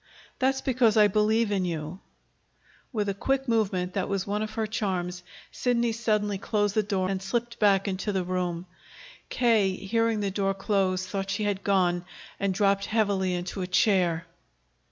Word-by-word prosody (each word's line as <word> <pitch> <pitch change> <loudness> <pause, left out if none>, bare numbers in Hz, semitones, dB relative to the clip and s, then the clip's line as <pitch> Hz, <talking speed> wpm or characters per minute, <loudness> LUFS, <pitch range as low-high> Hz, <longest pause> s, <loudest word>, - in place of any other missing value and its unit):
"That's 265 +1 +1
because 245 -4 +2
I 210 -1 +7
believe 215 +2 +2
in 195 -2 +1
you." 165 0 -4 0.9
With 210 -5 -1
a 200 - 0
quick 270 +6 -1
movement 195 -6 0
that 195 -1 -2
was 195 -1 -1
one 205 +1 -2
of 215 0 -4
her 225 -1 0
charms, 185 -4 -2 0.3
Sidney 240 -2 +1
suddenly 210 -3 0
closed 205 -1 0
the 215 - +3
door 195 -3 -1
and 190 0 -2
slipped 235 +4 -3
back 200 -2 +3
into 195 +2 -2
the 190 -2 0
room. 180 -1 -2 0.6
K., 220 -6 +2
hearing 225 +2 0
the 200 -1 -1
door 195 0 0
close, 190 -2 0
thought 195 0 -4
she 200 +2 -1
had 200 -2 -1
gone, 180 -3 +2 0.4
and 200 0 +1
dropped 200 0 +1
heavily 200 -4 +1
into 180 +2 -4
a 180 - -2
chair. 180 -3 +2
200 Hz, 170 wpm, -27 LUFS, 185-215 Hz, 0.9 s, I